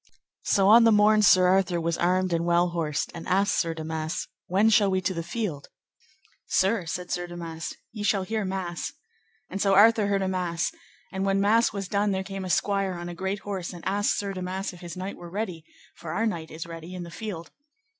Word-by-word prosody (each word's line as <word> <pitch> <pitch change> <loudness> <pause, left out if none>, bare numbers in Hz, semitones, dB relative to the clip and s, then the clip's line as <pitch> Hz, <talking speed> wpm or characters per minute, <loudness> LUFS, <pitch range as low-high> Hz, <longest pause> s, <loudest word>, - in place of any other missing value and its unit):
So 195 -2 +2
on 230 +3 +8
the 225 - +6
morn 215 0 +5
Sir 185 -3 +6
Arthur 185 -1 +3
was 165 0 -1
armed 185 +1 +1
and 165 0 +1
well 175 +1 +3
horsed, 160 -3 -2
and 165 - -8
asked 200 +2 +2
Sir 165 -2 -1
Damas, 160 0 -4 0.2
When 200 +5 +3
shall 205 -2 +5
we 190 0 +1
to 185 +1 -1
the 170 - -3
field? 175 -4 -4 0.8
Sir, 190 -1 +1
said 180 +2 -4
Sir 175 0 -2
Damas, 165 -2 -6 0.2
ye 220 -2 -7
shall 205 -2 +1
hear 215 +2 -2
mass. 185 -3 -4 0.5
And 195 - -4
so 195 -1 +3
Arthur 215 +1 +6
heard 200 -1 +1
a - - 0
mass, 180 -3 -1 0.4
and 190 0 -2
when 195 0 +2
mass 220 +4 +3
was 200 -3 -4
done 200 0 +1
there 190 0 -1
came 195 0 -6
a - - -5
squire 195 +2 +1
on 175 0 -6
a - - -6
great 190 +3 -3
horse, 190 -3 -5
and 175 - -10
asked 205 +2 +1
Sir 200 -1 -3
Damas 185 +1 -4
if 175 - -13
his 175 0 -8
knight 190 +2 -5
were 175 - -10
ready, 180 -4 -4 0.3
for 165 - -7
our 225 - 0
knight 170 -7 -3
is 160 +1 -7
ready 165 +1 -8
in 180 - -5
the 170 - -9
field. 180 -3 -6
185 Hz, 215 wpm, -26 LUFS, 170-200 Hz, 0.8 s, on